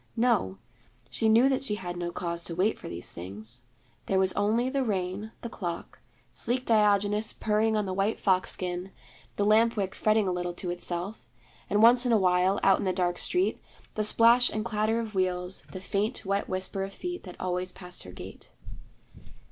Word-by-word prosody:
No, 225 - +2 0.5
she 225 - +1
knew 230 +4 +6
that 270 -1 0
she 210 -6 -1
had 175 -4 -5
no 175 0 -3
cause 170 -1 -3
to 170 - -4
wait 195 +5 +1
for - - -8
these 85 0 -4
things. 110 +7 -7 0.4
There 195 - +1
was 190 -1 +3
only 220 +5 +1
the 270 +1 0
rain, 200 0 -2
the - - -4
clock, 175 -6 -6 0.3
sleek 255 +2 -1
Diogenes 210 -1 +2
purring 220 +1 +1
on 210 - 0
the 190 - -3
white 195 +3 0
fox 185 -2 +2
skin, 180 +1 -2 0.4
the 205 - 0
lamp 225 +2 +4
wick 195 -2 -1
fretting 215 -1 +2
a - - +1
little 175 -1 -3
to 175 0 -4
itself, 175 +3 -4 0.5
and 205 +2 +3
once 240 +2 +7
in 245 - +1
a 225 - +5
while, 185 0 +2
out 195 - +5
in - - -2
the 185 - +2
dark 175 -1 0
street, 365 +2 0 0.3
the 215 - -1
splash 235 +3 +5
and 215 0 -3
clatter 220 0 0
of 225 -2 -5
wheels, 185 -1 -1
the 185 - -6
faint 205 +5 -2
wet 200 +1 -1
whisper 185 +1 -2
of 195 0 -6
feet 355 - -5
that 180 - -9
always 180 0 -1
passed 180 -1 -7
her 90 - -10
gate. 90 - -11
195 Hz, 195 wpm, -28 LUFS, 180-220 Hz, 0.5 s, once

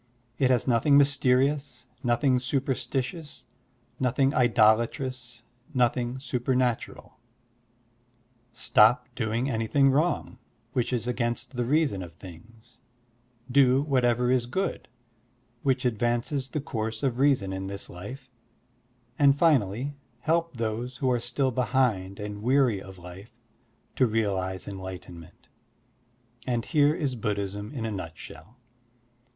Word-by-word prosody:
It 130 - +3
has 125 -1 +2
nothing 130 +4 +4
mysterious, 140 -1 +2 0.2
nothing 125 +1 +2
superstitioxis, 135 +1 -3 0.5
nothing 135 +2 +2
idolatrous, 120 +1 +2 0.3
nothing 125 0 +1
supernatural. 125 -1 -2 1.3
Stop 115 +2 +4
doing 115 +1 -1
anything 135 +3 +2
wrong, 155 +6 0 0.3
which 125 -1 0
is 120 -2 -1
against 120 +1 -2
the 120 -1 -1
reason 140 -7 +1
of 85 -2 -9
things; 110 +7 -14 0.7
do 135 0 +4
whatever 125 -3 +2
is 125 -2 +1
good, 190 +10 -3 0.7
which 130 -2 0
advances 120 +4 0
the 150 - -3
course 110 -5 -4
of 130 -2 0
reason 130 -9 +2
in 95 0 -4
this 100 0 -5
life; 125 +10 -9 0.9
and 140 -1 +5
finally 135 - +2 0.3
help 165 -2 0
those 115 +3 -3
who 130 0 +1
are 120 - +1
still 130 +3 -1
behind 120 -7 0
and 105 0 -6
weary 125 -4 +2
of 95 0 -11
life 90 +4 -12 0.6
to 130 - +4
realize 95 -4 -1
enlightenment: 95 -3 -9 1.0
and 120 -2 -1
here 150 -1 +3
is 140 -6 -1
Buddhism 105 -2 -3
in 125 -6 -4
a 110 - -2
nutshell. 90 - -9
120 Hz, 115 wpm, -27 LUFS, 110-135 Hz, 1.3 s, and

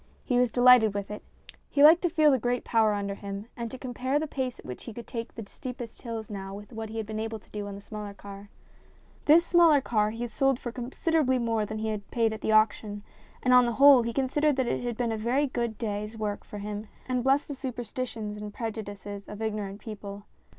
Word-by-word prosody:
He 245 -2 +1
was 250 -1 +3
delighted 245 -3 +6
with 200 0 -3
it. 210 - -6 0.5
He 285 - +3
liked 320 +3 +8
to 350 - +1
feel 310 -2 +4
the 265 - +3
great 245 +1 -1
power 220 -2 +3
under 200 -1 -2
him 200 0 -6
and 235 -1 -4
to 260 - -7
compare 255 +2 -2
the 310 - 0
pace 260 -4 -3
at - - -14
which 125 - -8
he 230 - -7
could 235 - -7
take 230 -1 -6
the 225 - -6
steepest 245 +1 -8
hills 225 -3 -6
now 195 -1 -6
with 205 +4 -11
what 220 -1 -5
he 225 - -6
had 220 - -2
been 215 +1 -5
able 220 0 -3
to 210 - -21
do 205 -1 -5
on 200 - -6
the 200 - -9
smaller 210 -1 -7
car. 200 0 -11 0.8
This 330 +3 +6
smaller 335 -5 +6
car 215 -5 +1
he 230 +2 -4
sold 270 +2 +1
for 240 - -5
consider 260 +7 -1
ably 260 -4 +2
more 225 -3 0
than 215 - -5
he 220 0 -2
had 210 -2 -4
paid 225 -2 +1
at 220 - -7
the - - 0
auction, 215 -1 +2 0.4
and 255 - +4
on 250 -1 +7
the 235 - 0
whole 275 0 +8
he 235 0 -2
considered 280 +4 +1
that 260 -1 +1
it - - -1
had 240 -2 -3
been 240 -2 0
a 220 - -2
very 245 +7 +1
good 235 -5 -2
day's 210 0 -4
work 210 -2 -3
for 210 - -9
him, 210 +1 -5 0.2
and 250 -1 0
blessed 270 +2 +3
the 290 - -4
superstitions 240 -4 -5
and 210 0 -7
prejudices 205 -3 -6
of 210 - -8
ignorant 210 -2 -3
people. 205 -2 -8
225 Hz, 240 wpm, -28 LUFS, 210-255 Hz, 0.8 s, liked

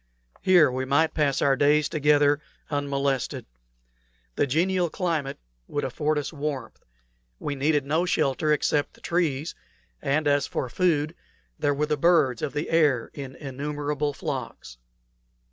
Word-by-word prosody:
Here 175 -7 +5
we 130 +1 -2
might 140 +5 +2
pass 145 -3 +1
our 140 -1 +4
days 150 +2 +3
together 145 -1 +3 0.3
unmolested. 140 -2 -1 0.9
The - - +1
genial 175 +5 +1
climate 160 -6 -2 0.3
would 145 - -3
afford 150 +4 -1
us 150 +2 -3
warmth; 140 -5 -5 0.5
we 145 - -3
needed 145 +1 +1
no 160 +5 +1
shelter 150 -1 +1
except 150 0 +1
the - - -21
trees, 160 -3 -1 0.5
and 150 +2 0
as 145 -1 +2
for 130 - -3
food, 155 0 +1 0.5
there 145 0 +1
were 150 +2 +1
the 150 0 -1
birds 150 -6 +3
of 140 - -3
the 150 +1 -3
air 150 -8 +2
in 135 -2 -7
innumerable 145 +1 -3
flocks. 60 - -6
145 Hz, 140 wpm, -26 LUFS, 140-155 Hz, 0.9 s, Here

